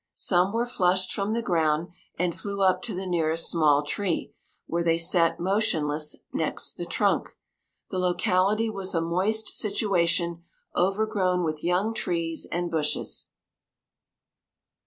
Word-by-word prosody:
Some 180 +1 +2
were 230 +2 0
flushed 185 -5 +1
from 200 +2 -1
the 230 0 -1
ground 160 -3 +1 0.3
and 175 0 0
flew 200 +1 -3
up 185 -1 +3
to 220 - -5
the 190 +1 -4
nearest 165 -2 +1
small 150 -3 +3
tree, 175 +4 -2 0.3
where 170 +1 -1
they 165 -1 +2
sat 165 0 +2
motionless 160 -6 0 0.2
next - - 0
the - - -6
trunk. - - 0 0.5
The 185 - -2
locality 185 +4 +2
was 195 -4 -2
a 165 - +2
moist 190 +7 +1
situation, 170 -5 +1 0.3
overgrown 190 -1 +1
with 155 -2 -3
young 180 +6 +1
trees 165 -5 -2
and 175 0 -2
bushes. 155 -2 -1
180 Hz, 135 wpm, -26 LUFS, 165-195 Hz, 0.5 s, up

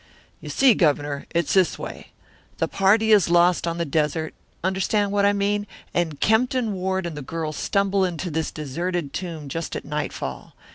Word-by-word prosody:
"You - - -9
see, 265 -3 +5
Governor, 145 -5 0
it's 170 -2 0
this 190 -3 +3
way: - - -8 0.5
the - - 0
party 215 +3 +3
is 200 -6 +5
lost 175 0 +4
on 170 0 -2
the 170 - -1
desert 155 +1 -1 0.3
understand 195 +2 +1
what 200 0 +2
I - - +5
mean 205 +1 0 0.3
and 165 -4 -1
Kempton 230 0 +2
Ward 190 0 -1
and 170 -2 -4
the 150 - -6
girl 155 +2 -4
stumble 200 +4 +1
into 175 -1 -2
this 160 +1 -1
deserted 165 +1 -3
tomb 165 -5 -5
just 165 +4 -4
at - - -5
nightfall. 145 - -5
175 Hz, 175 wpm, -23 LUFS, 155-200 Hz, 0.5 s, see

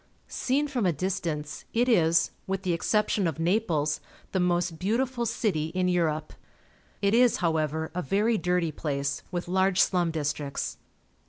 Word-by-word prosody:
Seen 280 +3 0
from 250 -9 0
a - - +4
distance, 165 -3 -3
it 240 +2 +3
is, 165 -8 +3 0.2
with 195 0 -2
the 180 -2 +1
exception 210 +2 +1
of 165 - -3
Naples, 165 -4 +1 0.3
the 190 - 0
most 175 -2 0
beautiful 235 +4 0
city 165 -9 0
in 185 0 +2
Europe. 160 -4 0 0.7
It 200 +1 +3
is, 245 0 +5
however, 160 -2 0
a 180 - -2
very 210 +6 +1
dirty 180 -2 +1
place, 140 -2 -2
with 175 -1 -4
large 190 +1 +2
slum 175 -3 +3
districts. 145 -3 -3
180 Hz, 150 wpm, -27 LUFS, 160-200 Hz, 0.7 s, is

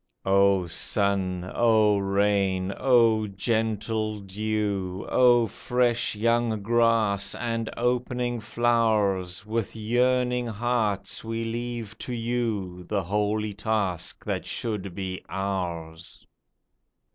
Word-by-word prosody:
O 100 -1 +4
sun! 95 0 -1
O 110 -3 +4
rain! 100 -1 +1
O 115 -4 +3
gentle 110 +1 -1
dew! 100 -2 -2
O 120 -2 +5
fresh 120 +1 0
young 115 -1 +1
grass, 110 -3 +2
and 115 -1 -2
opening 125 0 0
flowers! 110 -5 +1
With 110 0 -3
yearning 125 +2 +1
hearts 110 -3 -1
we 115 0 -3
leave 115 -1 -4
to 125 - -5
you 115 -6 -2
The 100 -2 -1
holy 105 +3 -1
task 100 -5 -2
that - - -2
should 100 -5 -3
be 95 -1 -5
ours 85 -4 -4
110 Hz, 100 wpm, -26 LUFS, 100-115 Hz, -, O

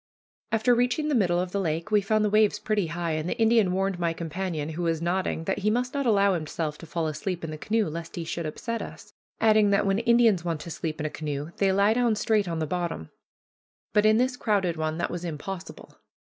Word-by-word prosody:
After 225 +3 +3
reaching 245 +6 +1
the - - +1
middle 180 -8 +2
of 180 0 -2
the 200 - -1
lake, 165 +1 -2
we 210 -1 +4
found 215 +2 +1
the - - +2
waves 215 -1 +4
pretty 210 -5 -1
high, 170 0 -3
and 155 +2 -2
the - - -2
Indian 225 -4 +4
warned 190 0 -1
my 170 -1 0
companion, 165 -1 -4
who 160 +2 -5
was 165 -2 0
nodding, 175 -1 -1
that 190 +4 -1
he 205 +2 +1
must 245 +3 0
not 280 -2 -1
allow 200 -3 +4
himself 155 -2 -3
to 165 - -10
fall 165 0 -2
asleep 175 +3 -3
in 160 - -4
the 155 - -6
canoe 220 +2 0
lest 165 +1 -6
he 170 - -3
should 165 0 -4
upset 230 +9 -4
us; - - -10 0.3
adding, 215 -2 +5
that 200 0 +2
when 195 +1 +2
Indians 235 -6 +4
want 165 -3 -2
to 170 - -7
sleep 160 -1 -4
in 155 - -2
a - - 0
canoe, 150 0 -4
they 195 -1 +3
lie 200 +3 +4
down 240 -2 +2
straight 210 -2 +1
on 165 -1 -2
the 160 - -1
bottom. 170 - -3 0.8
But 210 0 +4
in 215 0 +5
this 250 +1 +1
crowded 195 -7 +1
one 155 0 -2
that 175 - -2
was 175 0 -5
impossible. 175 +3 -7
185 Hz, 235 wpm, -26 LUFS, 165-215 Hz, 0.8 s, adding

